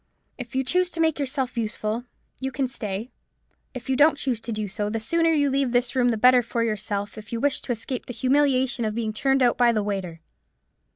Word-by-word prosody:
If 250 0 -8
you 265 - +1
choose 360 +7 +2
to 335 - -5
make 320 -2 +2
yourself 265 -2 -2
useful, 220 +1 -3 0.3
you 265 0 -3
can 265 0 -1
stay: 220 -2 -5 0.6
if 250 0 -7
you 265 - +1
don't 295 +2 +5
choose 260 -6 -1
to 230 - -6
do 215 -1 -3
so, 205 +1 -3
the 225 +1 -2
sooner 330 +9 +2
you 290 -3 +2
leave 270 -2 0
this 245 +1 +1
room 245 -1 +3
the 230 - 0
better 250 +2 +6
for 230 0 -2
yourself, 205 -1 -3
if 210 -1 -13
you 230 - -2
wish 285 +3 +1
to - - -5
escape 240 +2 -4
the 245 - -5
humiliation 260 0 +2
of 215 -1 -2
being 220 -2 -2
turned 270 +4 +2
out 245 - +2
by 240 -1 +5
the 215 -2 0
waiter." 190 -5 -4
245 Hz, 225 wpm, -24 LUFS, 220-270 Hz, 0.6 s, better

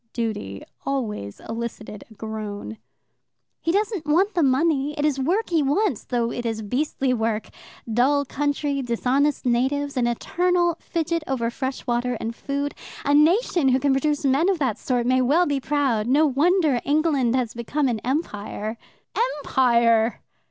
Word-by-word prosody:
"Duty" 210 - -3 0.2
always 215 - -3
elicited 225 -2 -6
a 220 - -16
groan. 215 0 -6 0.8
"He 330 - 0
doesn't 405 -4 -1
want 370 +7 +3
the 345 - +1
money, 290 +1 +2
it 295 - 0
is 285 -3 +1
work 360 +10 0
he 325 -2 +3
wants, 295 - 0
though 235 -2 -1
it 240 - -4
is 225 -2 -3
beastly 260 +3 0
work 225 -2 -1 0.4
dull 280 +5 +3
country, 285 0 -1
dishonest 260 +4 0
natives, 275 +4 0
an 245 -2 +1
eternal 345 +7 +1
fidget 335 -1 -2
over 240 -3 -1
fresh 260 +2 -4
water 245 0 0
and 230 +1 -4
food. 280 +2 -3 0.3
A 285 - +2
nation 330 - +4
who 260 +1 +3
can 280 +1 +2
produce 290 +2 0
men 275 +7 +3
of 385 - +2
that 255 -8 -1
sort 245 -2 0
may 255 +1 +3
well 300 +8 +3
be 285 -3 0
proud. 270 -6 0
No 290 +5 +4
wonder 300 -1 +2
England 285 -5 +2
has 250 -3 -1
become 265 +5 -1
an 235 -3 -1
Empire." 220 -5 -3 0.7
"EMPIRE!" 235 -3 +3
270 Hz, 155 wpm, -23 LUFS, 235-300 Hz, 0.8 s, nation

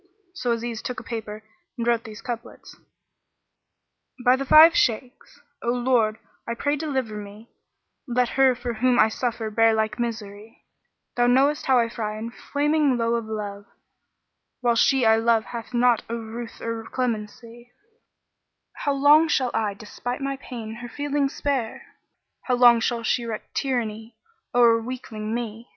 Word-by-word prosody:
So 255 -10 -2
Aziz 230 -1 -4
took 250 - -5
a - - -11
paper 220 -2 -6 0.3
and 235 - -2
wrote 235 0 +1
these 215 -1 -10
couplets, 240 -1 -7 1.5
"By 250 +1 +6
the 275 +1 -4
Five 320 +4 +8
Shaykhs,[FN#38] 245 - -2
O - - +2
Lord, 240 -3 +1 0.3
I 235 - -2
pray 285 +5 0
deliver 265 -7 -3
me; 210 +2 -11 0.3
* - - -54
Let 245 0 +1
her 265 -1 +3
for 240 0 -4
whom 245 +2 +2
I 220 - +5
suffer 225 -1 -3
bear 225 +1 +4
like 220 +2 -1
misery: 220 -2 -6 0.5
Thou 245 0 +3
knowest 275 +4 +2
how 260 -1 +5
I 235 -1 +3
fry 215 -2 -4
in 230 +2 -6
flaming 290 0 0
lowe 230 0 0
of 230 -1 -1
love, 205 -2 -6 0.5
* - - -55
While 240 -1 +3
she 265 +1 +3
I 220 0 +5
love 225 0 +2
hath 235 -1 -7
naught 240 -1 +3
of 235 - -2
ruth 230 +1 -8
or 230 -1 -4
clemency: 235 0 -4 1.1
How 285 - -1
long 295 +3 +5
shall 260 -5 +1
I, 210 -3 -1
despite 245 +5 -6
my 275 0 -2
pain, 230 -4 -8
her 240 - -7
feelings 285 +1 -1
spare? 265 -6 -2 0.3
* - - -54
How 250 - +1
long 240 -1 +6
shall 235 0 -1
she 240 +2 0
wreak 225 -2 -6
tyranny 225 -4 -3 0.4
o'er 230 -2 +5
weakling 225 -3 -5
me? 230 0 -6
235 Hz, 165 wpm, -24 LUFS, 225-255 Hz, 1.5 s, Five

